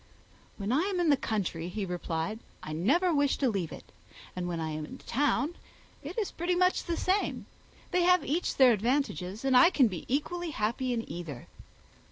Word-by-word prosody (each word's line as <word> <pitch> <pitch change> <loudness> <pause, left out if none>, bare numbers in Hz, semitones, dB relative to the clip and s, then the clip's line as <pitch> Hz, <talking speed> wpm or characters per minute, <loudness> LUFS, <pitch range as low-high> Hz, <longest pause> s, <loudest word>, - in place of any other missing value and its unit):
"When 200 +1 -3
I 275 +5 +3
am 365 - -1
in 335 -3 +3
the - - +6
country," 190 -9 -2
he 200 +2 -3
replied, 175 +3 -3 0.2
"I 155 - -5
never 330 - +2
wish 285 -2 +2
to 270 - +1
leave 190 -7 -2
it; - - -11 0.4
and 180 -1 -3
when 170 -2 -3
I 160 -1 -2
am 155 0 -4
in 150 - -8
town, 290 +4 0 0.5
it 310 +8 -8
is 430 -4 -1
pretty 350 +2 -1
much 365 +1 +2
the 340 -1 -2
same. 385 +2 0 0.5
They 360 - +2
have 360 +1 +4
each 325 +6 -1
their 260 -2 +7
advantages, 220 - -1
and 265 -1 +3
I 250 +7 +8
can 275 -9 +4
be 185 -6 -6
equally 335 +6 -1
happy 250 0 -1
in 230 -2 -2
either." 160 -8 -7
250 Hz, 195 wpm, -29 LUFS, -, 0.5 s, I